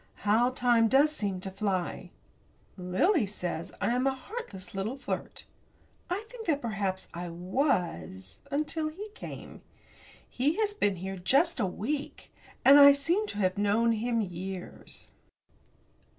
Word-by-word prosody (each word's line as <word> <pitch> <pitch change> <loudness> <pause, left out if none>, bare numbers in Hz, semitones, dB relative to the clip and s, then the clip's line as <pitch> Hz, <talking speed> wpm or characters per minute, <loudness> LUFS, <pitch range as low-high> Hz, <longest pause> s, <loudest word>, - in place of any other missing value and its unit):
How 225 +4 +4
time 240 -3 +3
does 275 +6 +4
seem 195 -6 -2
to 190 - -5
fly! 190 -2 -2 0.7
Lily 200 - +2
says 175 -4 -4
I - - +1
am 250 +2 +1
a 270 - +1
heartless 260 - -7
little 205 +7 -3
flirt. 270 - -5 0.6
I 390 +5 -2
think 485 -3 -10
that 295 -4 +2
perhaps 200 -6 -2
I 175 +1 -5
was, 175 - -2
until 305 +2 -1
he 400 +7 -8
came. - - -9 0.7
He 285 +6 0
has 420 0 0
been 205 - +1
here 190 +2 -5
just 275 - +3
a 205 - +2
week, 275 +10 -4 0.3
and 280 +2 +9
I 280 0 +10
seem 340 +10 +1
to - - -5
have 185 -1 +1
known 215 +3 +3
him 230 +1 0
years. 185 -1 -7
230 Hz, 140 wpm, -29 LUFS, 190-285 Hz, 0.7 s, I